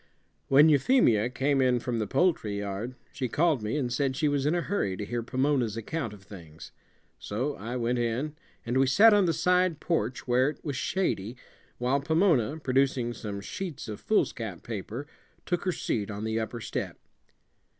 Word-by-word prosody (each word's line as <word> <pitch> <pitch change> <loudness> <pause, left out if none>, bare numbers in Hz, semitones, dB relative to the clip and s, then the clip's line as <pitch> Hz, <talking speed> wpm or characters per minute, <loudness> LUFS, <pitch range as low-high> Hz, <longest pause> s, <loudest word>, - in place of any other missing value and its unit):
When 145 +3 +7
Euphemia 135 - +4
came 135 +2 +1
in 125 -1 +3
from 120 -1 -2
the 105 - -1
poultry 110 - +1
yard, 100 +5 -4 0.2
she 130 -2 -2
called 155 -1 +2
me 105 +6 -2
and 125 -4 -1
said 135 +1 0
she 150 - +1
was 145 -1 +1
in 155 - +2
a 175 - +1
hurry 135 - -1
to 105 - -4
hear 120 +3 -2
Pomona's 130 -2 0
account 120 +2 -3
of 105 -2 -13
things. 85 -5 -12 0.5
So 125 +8 -2
I 120 +1 -6
went 120 0 0
in, 120 +6 -1 0.3
and 120 +3 +1
we 135 - +4
sat 215 +11 +7
on 205 -2 +4
the 170 - +2
side 180 -1 +2
porch, 130 -8 -2
where 125 +3 +3
it 150 - -10
was 145 -3 -2
shady, 125 - -1 0.4
while 125 +3 +1
Pomona, 160 - +2
producing 130 -4 +1
some 105 -3 -6
sheets 175 - -6
of 105 -2 -6
foolscap 115 - -1
paper, 115 +4 -5 0.4
took 175 0 -1
her 185 - +2
seat 110 - -2
on 105 0 -5
the 110 0 -1
upper 115 +1 -4
step. - - -4
125 Hz, 180 wpm, -28 LUFS, 110-150 Hz, 0.5 s, When